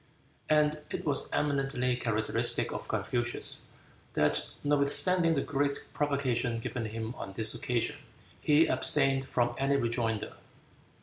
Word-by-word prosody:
And 150 Hz, 0 st, +3 dB
it -, -, -5 dB
was 145 Hz, -, 0 dB
eminently 135 Hz, -3 st, 0 dB
characteristic 110 Hz, -3 st, +1 dB
of -, -, -6 dB
Confucius, 120 Hz, -1 st, +2 dB, 0.5 s
that 75 Hz, 0 st, +1 dB
notwithstanding 160 Hz, +4 st, +2 dB
the 140 Hz, -, +1 dB
great 140 Hz, 0 st, -1 dB, 0.2 s
provocation 130 Hz, -5 st, -1 dB
given 115 Hz, 0 st, -4 dB
him 110 Hz, +1 st, -5 dB
on 95 Hz, -, -7 dB
this 110 Hz, +2 st, +1 dB
occasion, 120 Hz, 0 st, -1 dB, 0.4 s
he 150 Hz, +2 st, +4 dB
abstained 135 Hz, -3 st, +3 dB
from 120 Hz, -1 st, 0 dB
any 135 Hz, +1 st, +1 dB
rejoinder. 115 Hz, -4 st, -1 dB
135 Hz, 120 wpm, -30 LUFS, 115-145 Hz, 0.5 s, he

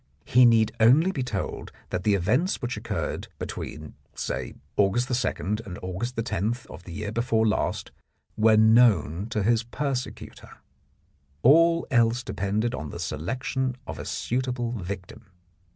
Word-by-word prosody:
He 125 Hz, +1 st, +6 dB
need 115 Hz, -2 st, +4 dB
only 140 Hz, +11 st, +5 dB
be 140 Hz, -, -3 dB
told 105 Hz, -7 st, -4 dB, 0.2 s
that 90 Hz, -, -2 dB
the 105 Hz, 0 st, +3 dB
events 120 Hz, -, +1 dB
which 120 Hz, +1 st, -3 dB
occurred -, -, -4 dB
between, 75 Hz, 0 st, -6 dB, 0.2 s
say, 65 Hz, -2 st, -4 dB, 0.2 s
August 120 Hz, +6 st, +2 dB
2 110 Hz, -, 0 dB, 0.4 s
and 95 Hz, -4 st, -8 dB
August 95 Hz, +7 st, -4 dB
10 110 Hz, -1 st, -1 dB, 0.2 s
of 90 Hz, -, -11 dB
the 90 Hz, -, -9 dB
year 105 Hz, +4 st, -4 dB
before 115 Hz, 0 st, +1 dB
last 105 Hz, -, -1 dB, 0.4 s
were 110 Hz, 0 st, +5 dB
known 110 Hz, -6 st, +4 dB
to 105 Hz, -2 st, -1 dB
his 115 Hz, +2 st, +3 dB
persecutor. 125 Hz, +2 st, -5 dB, 0.9 s
All 165 Hz, +5 st, +5 dB
else 120 Hz, 0 st, +3 dB
depended 110 Hz, +1 st, -1 dB
on 75 Hz, -10 st, -5 dB
the -, -, -7 dB
selection 125 Hz, -, -2 dB
of -, -, -7 dB
a -, -, -6 dB
suitable 125 Hz, -1 st, -2 dB
victim. 100 Hz, 0 st, -7 dB
115 Hz, 140 wpm, -26 LUFS, 100-125 Hz, 0.9 s, He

